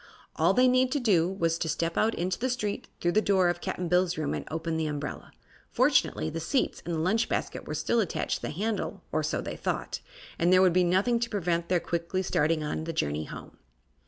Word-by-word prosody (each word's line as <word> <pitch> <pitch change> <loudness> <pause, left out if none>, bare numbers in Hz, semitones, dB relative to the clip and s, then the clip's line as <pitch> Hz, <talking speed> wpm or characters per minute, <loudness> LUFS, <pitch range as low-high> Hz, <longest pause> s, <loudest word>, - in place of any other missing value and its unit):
All 170 +4 +3
they 255 +1 +5
need 255 0 +3
to 290 - +1
do 185 -9 +3
was 165 -3 0
to 160 - -1
step 165 +1 -1
out 225 +1 +2
into 180 +1 -2
the 255 - 0
street, 215 -5 -2
through 175 - +1
the 215 - +3
door 190 -4 +3
of 175 0 -2
Cap'n 180 - -3
Bill's 180 +1 +2
room, 155 -2 -1
and - - -5
open 160 +1 -3
the 160 -1 0
umbrella. 145 -1 -5 0.4
Fortunately, 80 - +2
the 165 - -3
seats 255 - -1
and 170 - -1
the - - -1
lunch 190 +8 +1
basket - - -3
were - - -3
still 235 - +1
attached 200 -7 -1
to - - -17
the - - -3
handle 210 +7 -3
or - - +1
so - - -1
they - - -5
thought - - -3 0.4
and 170 +1 +3
there 185 0 +6
would 185 -2 +4
be 180 +1 +4
nothing 190 +7 +2
to 235 0 -2
prevent 170 -5 -1
their 180 -1 +3
quickly 170 +3 -2
starting 155 -2 +1
on 150 +1 -3
the 165 - -3
journey 75 - -1
home. - - -10
175 Hz, 230 wpm, -28 LUFS, 165-205 Hz, 0.4 s, there